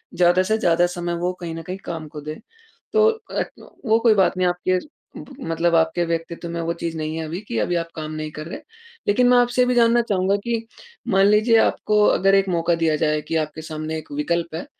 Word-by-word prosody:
ज़्यादा 175 Hz, +1 st, +4 dB
से 215 Hz, +4 st, +1 dB
ज़्यादा 175 Hz, -5 st, +3 dB
समय 175 Hz, 0 st, -2 dB
वो 180 Hz, +1 st, -1 dB
कहीं 165 Hz, -2 st, -5 dB
न 165 Hz, -, -6 dB
कहीं 180 Hz, +3 st, -6 dB
काम 160 Hz, -2 st, -5 dB
को 150 Hz, 0 st, -9 dB
दे। 155 Hz, +1 st, -6 dB, 0.6 s
तो 440 Hz, 0 st, +5 dB, 0.3 s
ए -, -, +2 dB
क -, -, -16 dB
वो 220 Hz, -1 st, +4 dB
कोई 230 Hz, -1 st, +5 dB
बात 190 Hz, -1 st, +2 dB
नहीं 185 Hz, -, +2 dB
आपके 180 Hz, +1 st, 0 dB, 0.4 s
ब -, -, -9 dB
मतलब 170 Hz, -4 st, 0 dB
आपके 160 Hz, +1 st, +2 dB
व्यक्तित्व 165 Hz, +1 st, -4 dB
में 170 Hz, 0 st, -4 dB
वो 165 Hz, +1 st, -1 dB
चीज़ 170 Hz, -1 st, -5 dB
नहीं 155 Hz, +1 st, -3 dB
है 160 Hz, -, -3 dB
अभी 165 Hz, +3 st, -5 dB
कि 115 Hz, -, -3 dB
अभी 175 Hz, +11 st, 0 dB
आप 165 Hz, -1 st, -2 dB
काम 155 Hz, -1 st, -5 dB
नहीं 155 Hz, 0 st, -5 dB
कर 155 Hz, 0 st, -8 dB
रहे। 170 Hz, -, -7 dB, 0.5 s
लेकिन 245 Hz, +5 st, +3 dB
मैं 250 Hz, -, +6 dB
आपसे 245 Hz, +1 st, +3 dB
ये 250 Hz, -, +5 dB
भी 250 Hz, -, +1 dB
जानना 235 Hz, 0 st, +4 dB
चाहूँगा 195 Hz, -3 st, +1 dB
कि 230 Hz, -1 st, -2 dB, 0.5 s
मान 195 Hz, +1 st, +5 dB
लीजिए 215 Hz, +3 st, +4 dB
आपको 210 Hz, 0 st, +1 dB
अगर 195 Hz, 0 st, +4 dB
एक 195 Hz, 0 st, +3 dB
मौक़ा 170 Hz, -1 st, +1 dB
दिया 165 Hz, -2 st, +1 dB
जाए 150 Hz, -1 st, +1 dB
कि 165 Hz, -, -2 dB
आपके 155 Hz, +1 st, -8 dB
सामने 155 Hz, 0 st, -5 dB
एक 155 Hz, -, -10 dB
विकल्प 165 Hz, +3 st, -2 dB
है 165 Hz, -, -5 dB
170 Hz, 235 wpm, -22 LUFS, 160-195 Hz, 0.6 s, मैं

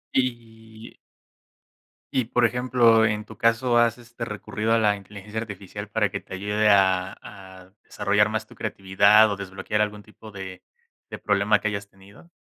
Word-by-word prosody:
Y 115 Hz, -3 st, -4 dB, 1.2 s
y 130 Hz, -3 st, 0 dB
por 120 Hz, +1 st, +2 dB
ejemplo, 120 Hz, -2 st, +3 dB
en 105 Hz, -1 st, -1 dB
tu 110 Hz, -, -13 dB
caso, 120 Hz, +1 st, +2 dB
¿has 120 Hz, 0 st, +3 dB
este, 120 Hz, 0 st, -9 dB
recurrido 105 Hz, +1 st, -4 dB
a -, -, +4 dB
la 105 Hz, -2 st, +2 dB
inteligencia 105 Hz, +2 st, -8 dB
artificial 100 Hz, -1 st, -8 dB
para 105 Hz, -1 st, +1 dB
que -, -, -4 dB
te 95 Hz, -, -9 dB
ayude 105 Hz, +2 st, +1 dB
a 95 Hz, -2 st, +3 dB
a 95 Hz, -1 st, -13 dB
desarrollar 105 Hz, +1 st, +1 dB
más 110 Hz, 0 st, -3 dB
tu -, -, -16 dB
creatividad 100 Hz, +1 st, +3 dB
o -, -, -1 dB
desbloquear 100 Hz, +2 st, -3 dB
algún 105 Hz, 0 st, -2 dB
tipo 110 Hz, 0 st, -14 dB
de 95 Hz, -2 st, -9 dB, 0.5 s
de -, -, -7 dB
problema 105 Hz, +1 st, +2 dB
que 105 Hz, -, -2 dB
hayas 100 Hz, -1 st, -5 dB
tenido? 100 Hz, -, -19 dB
105 Hz, 165 wpm, -24 LUFS, 100-115 Hz, 1.2 s, a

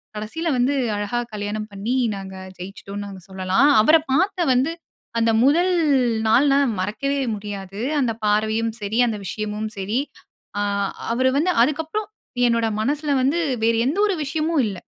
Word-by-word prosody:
கடைசீல 315 Hz, +11 st, -3 dB
வந்து 250 Hz, +3 st, +2 dB, 0.2 s
அழகா 205 Hz, +4 st, -2 dB
கல்யாணம் 210 Hz, +1 st, -4 dB
பண்ணி 210 Hz, +6 st, -2 dB, 0.2 s
நாங்க 190 Hz, -1 st, -8 dB, 0.2 s
ஜெயிச்சுட்டோன்னு 195 Hz, +2 st, -7 dB
நாங்க 195 Hz, -2 st, -9 dB
சொல்லலாம். 190 Hz, +8 st, +2 dB
அவர 305 Hz, +9 st, +6 dB, 0.2 s
பார்த்த 360 Hz, +2 st, +1 dB
வந்து 265 Hz, +6 st, +2 dB, 0.5 s
அந்த 230 Hz, 0 st, +3 dB
1ல் 345 Hz, +7 st, +4 dB, 0.6 s
நாள் 255 Hz, +6 st, +5 dB
நான் 275 Hz, -5 st, +2 dB
மறக்கவே 245 Hz, +9 st, -1 dB, 0.2 s
முடியாது. 200 Hz, -1 st, -7 dB, 0.2 s
அந்த 245 Hz, -4 st, +1 dB
பார்வையும் 220 Hz, +2 st, +1 dB
சரி, 205 Hz, +2 st, -2 dB
அந்த 220 Hz, -2 st, -2 dB
விஷயமும் 215 Hz, +2 st, -3 dB
சரி. 205 Hz, +6 st, -1 dB, 0.6 s
ஆ -, -, +1 dB, 0.5 s
அவர் 255 Hz, +2 st, +2 dB
வந்து 350 Hz, +5 st, +2 dB
அதுக்கப்புறம் 320 Hz, -, -2 dB, 0.4 s
என்னோட 230 Hz, -1 st, +2 dB
மனசில 290 Hz, +4 st, -1 dB
வந்து 280 Hz, +6 st, +2 dB, 0.3 s
வேற 230 Hz, -, +3 dB
எந்த 305 Hz, -, -1 dB
ஒரு 390 Hz, -4 st, -1 dB
விஷயமும் 310 Hz, 0 st, 0 dB
இல்ல. 195 Hz, -, -6 dB
230 Hz, 145 wpm, -22 LUFS, 205-285 Hz, 0.6 s, அவர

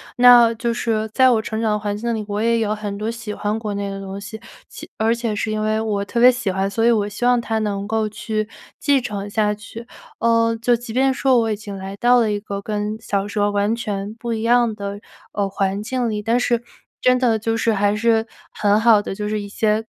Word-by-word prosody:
那 245 Hz, -2 st, +7 dB
就 235 Hz, +1 st, -1 dB
是 225 Hz, -2 st, -1 dB
在 260 Hz, +1 st, +5 dB
我 235 Hz, -3 st, +3 dB
成 220 Hz, +1 st, -4 dB
长 220 Hz, -2 st, +1 dB
的 -, -, +1 dB
环 205 Hz, -1 st, -3 dB
境 230 Hz, +2 st, -2 dB
里， 215 Hz, -1 st, -4 dB
我 205 Hz, 0 st, -2 dB
也 230 Hz, +1 st, +2 dB
有 215 Hz, -2 st, 0 dB
很 205 Hz, -1 st, -5 dB
多 215 Hz, +2 st, -2 dB
喜 225 Hz, -2 st, -7 dB
欢 210 Hz, +1 st, -2 dB
国 210 Hz, -2 st, -4 dB
内 200 Hz, 0 st, -3 dB
的 195 Hz, 0 st, -6 dB
东 195 Hz, 0 st, -6 dB
西， 210 Hz, +2 st, -9 dB, 0.3 s
且 -, -, -11 dB
而 220 Hz, +1 st, +2 dB
且 235 Hz, -2 st, -2 dB
是 215 Hz, +1 st, -2 dB
因 215 Hz, 0 st, -1 dB
为 215 Hz, 0 st, 0 dB
我 210 Hz, -2 st, -1 dB
特 220 Hz, +4 st, -3 dB
别 250 Hz, +2 st, +8 dB
喜 245 Hz, -5 st, -3 dB
欢， 190 Hz, +1 st, -1 dB
所 200 Hz, +3 st, -1 dB
以 235 Hz, -, +5 dB
我 215 Hz, -3 st, +2 dB
希 205 Hz, +4 st, -4 dB
望 245 Hz, 0 st, +4 dB
它 225 Hz, -1 st, -2 dB
能 205 Hz, -2 st, -2 dB
够 220 Hz, 0 st, 0 dB
去 215 Hz, 0 st, -3 dB, 0.3 s
继 285 Hz, -2 st, +3 dB
承 205 Hz, -4 st, -5 dB
下 210 Hz, 0 st, +1 dB
去。 225 Hz, +2 st, -10 dB, 0.3 s
呃， 230 Hz, 0 st, +2 dB
就 240 Hz, +1 st, +3 dB
即 235 Hz, -1 st, -8 dB
便 265 Hz, +2 st, +3 dB
说 260 Hz, -1 st, +2 dB
我 225 Hz, -1 st, 0 dB
已 -, -, 0 dB
经 205 Hz, -1 st, -8 dB
来 190 Hz, +1 st, -7 dB
到 245 Hz, +3 st, +4 dB
了 220 Hz, -3 st, +1 dB
一 205 Hz, -, -1 dB
个 200 Hz, -1 st, -5 dB
跟 210 Hz, +1 st, -3 dB
小 200 Hz, -2 st, -2 dB
时 205 Hz, -, -7 dB
候 205 Hz, 0 st, +2 dB
完 205 Hz, +2 st, +1 dB
全 210 Hz, -2 st, -4 dB
不 235 Hz, 0 st, -4 dB
一 220 Hz, -, -3 dB
样 235 Hz, 0 st, +3 dB
的， 200 Hz, -1 st, -6 dB, 0.3 s
呃， 200 Hz, -1 st, 0 dB
环 195 Hz, +1 st, -2 dB
境 245 Hz, +1 st, -1 dB
里， 210 Hz, -1 st, -3 dB
但 230 Hz, +3 st, +2 dB
是 240 Hz, -1 st, 0 dB, 0.4 s
真 255 Hz, 0 st, +4 dB
的 235 Hz, -3 st, +2 dB
就 225 Hz, +1 st, -1 dB
是， 225 Hz, 0 st, +1 dB
还 205 Hz, 0 st, +2 dB
是 225 Hz, +1 st, +2 dB, 0.3 s
很 205 Hz, 0 st, +2 dB
好 220 Hz, -2 st, +5 dB
的 205 Hz, -, -5 dB
就 210 Hz, +1 st, -4 dB
是 210 Hz, 0 st, -2 dB
一 200 Hz, -, -8 dB
些， 215 Hz, +1 st, 0 dB
220 Hz, 265 characters per minute, -20 LUFS, 205-230 Hz, 0.4 s, 别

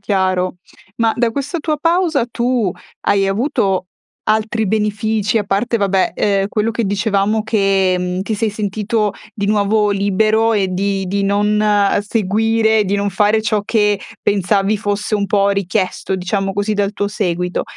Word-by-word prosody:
chiaro. 185 Hz, -2 st, 0 dB, 0.4 s
Ma, 225 Hz, -1 st, +2 dB
da 235 Hz, -1 st, +1 dB
questa 285 Hz, +7 st, -3 dB
tua 305 Hz, 0 st, -1 dB
pausa, 330 Hz, -4 st, +1 dB
tu 235 Hz, -5 st, 0 dB, 0.3 s
hai 195 Hz, -1 st, +2 dB
avuto 195 Hz, -3 st, 0 dB, 0.4 s
altri 220 Hz, +1 st, +1 dB
benefici, 215 Hz, +1 st, 0 dB
a 205 Hz, -, -2 dB
parte, 210 Hz, +5 st, 0 dB
vabbè, 195 Hz, -3 st, +1 dB
uhm, 200 Hz, -1 st, +1 dB
quello 220 Hz, +2 st, -1 dB
che 230 Hz, -, -1 dB
dicevamo 205 Hz, +2 st, 0 dB
che, 195 Hz, -4 st, +2 dB
mhmm, 180 Hz, +1 st, -2 dB
ti 215 Hz, +2 st, -2 dB
sei 220 Hz, +1 st, -1 dB
sentito 210 Hz, 0 st, -1 dB, 0.2 s
di 200 Hz, -1 st, -3 dB
nuovo 210 Hz, 0 st, +2 dB
libero 215 Hz, +3 st, +2 dB
e 200 Hz, -3 st, +1 dB
di 195 Hz, +1 st, -1 dB
di 200 Hz, +2 st, -1 dB
non, 200 Hz, +1 st, +1 dB
uhm, 205 Hz, -1 st, +2 dB
seguire, 220 Hz, +1 st, +1 dB
di 200 Hz, +1 st, 0 dB
non 200 Hz, 0 st, 0 dB
fare 210 Hz, +3 st, +2 dB
ciò 215 Hz, -1 st, 0 dB
che 210 Hz, -2 st, +1 dB, 0.2 s
pensavi 200 Hz, +1 st, +1 dB
fosse 205 Hz, +1 st, -2 dB
un 200 Hz, -1 st, 0 dB
po' 200 Hz, 0 st, +2 dB
richiesto, 195 Hz, -1 st, -1 dB
diciamo 195 Hz, +2 st, -2 dB
così, 205 Hz, +2 st, -1 dB
dal 200 Hz, 0 st, 0 dB
tuo 205 Hz, -, -2 dB
seguito; 180 Hz, -4 st, -2 dB
205 Hz, 160 wpm, -17 LUFS, 195-220 Hz, 0.4 s, Ma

